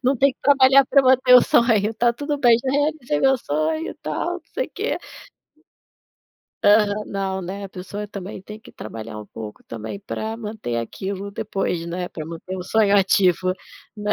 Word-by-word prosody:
não 265 +2 +2
tem 275 +2 +3
que - - -39
trabalhar 275 -1 +6
pra 275 - +4
manter 255 -1 +5
o 250 - +9
sonho". 225 -2 +3
"Tá 240 +1 +2
tudo 290 +4 -3
bem, 240 -4 +5
já 260 - -1
realizei 290 - 0
meu 270 0 +4
sonho 155 -2 -2
e - - -9
tal, 155 - -3
não 360 - -7
sei - - -1
quê" - - -3 1.7
Aham. 210 0 +4
Não, 190 -1 -3
né, 195 +3 -6
a - - -7
pessoa 200 +3 -7
também 195 -1 -7
tem 210 +3 -10
que 220 - -16
trabalhar 110 0 -8
um 105 - -11
pouco, 110 -1 -9
também, 115 - -7
pra 220 +2 -5
manter 210 - -5
aquilo 190 - -5
depois, 195 -5 -3
né, 180 +1 -4
pra 155 - -7
manter 170 +3 -7
o 185 - -5
sonho 205 +1 +3
ativo, 185 -1 +3 0.4
né. 210 0 -1
205 Hz, 185 wpm, -22 LUFS, 180-240 Hz, 1.7 s, o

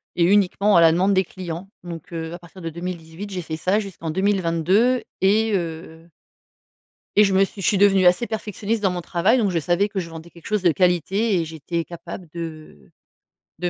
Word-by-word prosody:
et 175 - +2
uniquement 200 +2 +3
à 170 - +7
la 165 - +7
demande 185 +4 +2
des 190 0 +3
clients, 180 0 -7
donc, 170 -2 -9
heu, 165 0 -5
à 175 - -7
partir 175 +2 -14
de 165 - -4
2018, 170 +2 -7
j'ai 185 -2 -4
fait 160 0 -5
ça 185 +6 +1
jusqu'en 190 -6 -6
2022 190 +6 +2 0.2
et 215 +3 +3
heu 165 -1 -5 1.1
et 210 - +7
je 195 -1 +1
me 195 - +5
suis 195 0 -8
je - - 0
suis 200 - +3
devenue 195 -2 +5
assez 180 +7 +4
perfectionniste 220 0 -3
dans 195 - +3
mon 180 - -3
travail, 180 +8 +2
donc 210 -5 +1
je 170 - 0
savais 175 +6 +1
que 200 - -5
je 170 -2 -7
vendais 165 +1 -10
quelque 170 - -16
chose 210 -2 0
de 175 - +4
qualité 185 +3 +1
et - - -1
j'étais 165 +1 -4
capable 175 +1 -9
de 155 - -8 0.7
de 180 - -1
180 Hz, 205 wpm, -22 LUFS, 165-200 Hz, 1.1 s, à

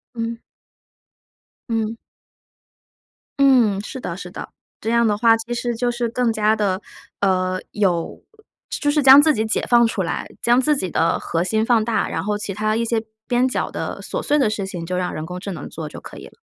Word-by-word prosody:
嗯。 230 0 -4 1.3
嗯。 225 -1 -1 1.4
嗯， 245 -8 +4
是 260 - -7
的 170 - -5
是 180 -2 -8
的。 - - -7 0.3
这 220 - -3
样 235 0 +3
的 210 -1 +1
话， 225 +1 +5
其 230 +2 -5
实 240 0 -2
就 240 +1 0
是 240 -1 -2
更 240 0 +1
加 215 0 +2
地， 200 -3 0 0.4
呃， 185 -1 +1
有 180 -5 -1 0.5
就 290 - -1
是 295 +1 +2
将 270 +2 +10
自 310 +1 +4
己 220 -4 -1
解 220 - -1
放 240 -1 +6
出 220 -3 -1
来， 175 - -3
将 240 +2 +4
自 300 +3 +2
己 185 -10 -3
的 165 0 +1
核 165 0 -1
心 220 +4 0
放 225 -2 +3
大， 230 -2 0
然 - - -3
后 210 0 -1
其 205 -1 -5
它 215 +2 0
一 230 - 0
些 230 -1 0 0.2
边 250 +1 +2
角 255 - -2
的 - - -5
琐 - - -4
碎 295 - +1
的 245 -6 +3
事 210 -2 -3
情 175 -3 -6
就 180 +1 -2
让 180 -1 -2
人 155 - -5
工 180 +2 -6
智 200 +2 -6
能 160 -6 -7
做 155 -1 -6
就 - - -9
可 - - -11
以 - - -10
了。 - - -18
220 Hz, 225 characters per minute, -21 LUFS, 190-240 Hz, 1.4 s, 将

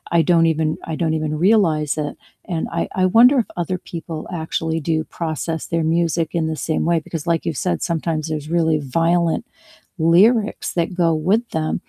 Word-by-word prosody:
I - - +6
don't 165 -1 +3
even 155 0 -1
I 160 - -2
don't 160 -1 0
even 155 0 -2
realize 160 -9 +3
it, - - -7 0.4
and 160 - -1
I - - -1 0.2
I - - +4
wonder 250 +4 +7
if 230 - +1 0.2
other 185 +2 -2 0.2
people 165 -1 -5 0.2
actually 160 0 -2
do 160 0 +1 0.2
process 160 -1 -2
their 165 -1 -1
music 165 -1 0
in 160 - 0
the 160 - -2
same 160 - 0
way, 170 - +3
because 160 0 -7
like 165 - 0
you've 155 - -2
said, 85 - +1
sometimes 160 -1 -1
there's 155 -1 -4
really 160 -2 +2 0.2
violent 170 +5 +1 0.5
lyrics 205 +7 +3
that 170 +1 0
go 165 - +4 0.2
with 225 +4 +3
them, 155 0 -1
165 Hz, 185 wpm, -20 LUFS, 155-170 Hz, 0.5 s, wonder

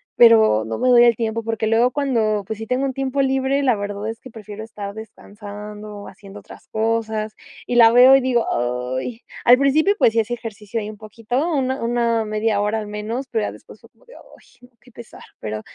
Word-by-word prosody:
pero 220 - +5
no 110 0 -5
me 255 - +2
doy 240 -1 +7
el 235 -1 +5
tiempo, 225 0 -3
porque 225 0 -2
luego 230 +3 +3
cuando, 230 -7 0
pues, 220 - -5
sí 225 - -7
tengo 255 +4 -1
un 270 - -2
tiempo 270 +1 -1
libre, 270 +1 0
la 255 -4 +2
verdad 205 +1 -5
es 225 +1 -7
que 255 - -13
prefiero 215 -1 -9
estar 205 -2 -8
descansando 210 -1 -10
o 205 - -10
haciendo 200 +1 -12
otras - - -15
cosas. 220 -1 -2 0.3
Y 245 - -2
la 230 -1 +7
veo 250 +3 +7
y 270 - +4
digo: 250 -2 0 0.5
"Ay". 230 - -7 0.2
Al 245 +1 +7
principio, 305 +8 +3
pues, 225 - +4
sí 230 - +2
hace 225 +2 -5
ejercicio 225 -2 -6
ahí 210 -1 -5
un 215 - -10
poquito, 230 +7 -3
una 265 -3 -1
una 235 -1 0
media 215 0 -1
hora 210 +2 -1
al 210 - -6
menos, 220 +5 -5
pero 225 -2 -1
ya - - -4
después - - -15
fue - - -20
como - - -29
de: - - -16
"Ay, - - -14 0.4
no, 245 - -19
qué 250 - -20
pesar", 235 0 -13 0.2
pero 110 0 -5
225 Hz, 220 wpm, -20 LUFS, 210-250 Hz, 0.5 s, doy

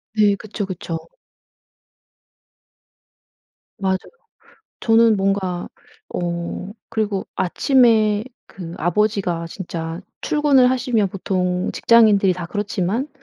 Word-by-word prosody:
네 210 -2 +4
그쵸 210 0 -5
그쵸. 170 -3 -6 2.7
맞아요. 190 -1 0 0.8
저는 225 -1 +4
뭔가 190 -2 -1 0.5
어 175 +3 -3 0.2
그리고 215 -4 -2
아침에 220 0 +3 0.2
그 175 -3 -9
아버지가 180 -2 0
진짜 165 -2 -6 0.2
출근을 280 -4 +3
하시면 245 -5 +1
보통 180 -1 -1
직장인들이 215 -5 +5
다 180 -1 -6
그렇지만 205 - -2
200 Hz, 200 characters per minute, -21 LUFS, 180-220 Hz, 2.7 s, 직장인들이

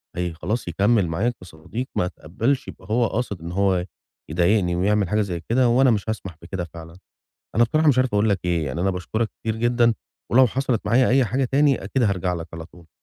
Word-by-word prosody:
هي 90 -1 -2
خلاص 110 +7 -3
يكمّل 100 +2 +2
معايا 105 +9 0
كصديق، 90 +9 -7
ما 90 - +1
اتقبّلش 110 - -2
يبقى - - -11
هو 120 0 +3
قاصد 105 -7 -3
إن 85 +1 -6
هو 95 -1 +1 0.4
يضايقني 90 +2 +2
ويعمل 100 +1 +1
حاجة 105 0 +2
زي 90 -4 -3
كده، 125 +1 +3
وأنا 130 +2 +4
مش 110 0 -1
هاسمح 95 -6 -4
بكده 90 +1 -5
فعلًا. 80 +1 -12 0.6
أنا 120 - +5
بصراحة 155 +7 +2
مش 130 -3 +4
عارف 130 -3 +2
أقول 105 +2 +3
لك 100 -2 +1
إيه، 85 -3 0
يعني 75 +5 -3
أنا 95 - +2
باشكرك 110 +5 -2
كتير 110 -1 -2
جدًا 120 0 +2 0.4
ولو 130 +1 +6
حصلت 130 -1 -1
معايا 120 +4 +4
أي 130 0 +4
حاجة 130 +5 0
تاني، 140 -2 +2
أكيد 120 +6 0
هارجع 95 -4 0
لك 85 0 -5
على 80 0 -7
طول. 85 0 -18
105 Hz, 205 wpm, -23 LUFS, 90-120 Hz, 0.6 s, ولو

